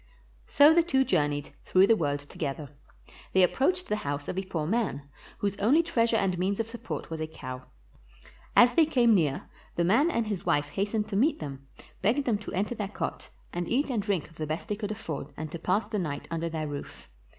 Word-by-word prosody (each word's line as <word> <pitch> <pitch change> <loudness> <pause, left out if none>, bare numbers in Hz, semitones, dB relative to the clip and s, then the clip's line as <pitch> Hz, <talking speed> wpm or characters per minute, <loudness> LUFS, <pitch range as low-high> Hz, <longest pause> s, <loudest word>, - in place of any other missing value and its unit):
So 290 +2 +7
the 340 - +6
two 270 -6 +2
journeyed, 145 - 0
through 185 +1 +5
the 225 - +5
world 145 -6 -1
together. 145 0 -5 0.6
They 190 - +5
approached 360 - +2
the 210 - 0
house 145 -5 -4
of - - -3
a 190 - -1
poor 165 -5 -3
man, 195 -7 -1 0.3
whose 200 -1 -1
only 270 +12 +4
treasure 235 -8 +2
and 185 -4 0
means 195 +3 0
of 225 - -1
support 235 -6 -6
was 160 -1 -4
a 155 - -2
cow. 130 -4 -8 0.9
As 245 0 +7
they 325 -2 +5
came 240 -6 +4
near, 150 -8 +1 0.3
the 170 - +1
man 230 - +4
and 235 -9 0
his 205 -4 -3
wife 145 0 +1
hastened 210 +6 -1
to 200 - -3
meet 270 +10 +3
them, 135 -3 -7 0.3
begged 245 +9 +2
them 220 -4 +1
to 215 - -8
enter 205 +5 -1
their 210 -4 -3
cot, 205 - -5 0.2
and 175 0 -3
eat 275 +3 +1
and 230 -4 0
drink 200 -6 -1
of 165 - -20
the 155 - -3
best 155 +8 -4
they 210 - 0
could 205 0 -4
afford, 165 -10 -5
and 155 0 -5
to 170 - -5
pass 200 +7 +1
the 210 - -3
night 145 -5 -4
under 165 0 -2
their 155 -1 -3
roof. 145 -1 -8
195 Hz, 215 wpm, -28 LUFS, 155-230 Hz, 0.9 s, So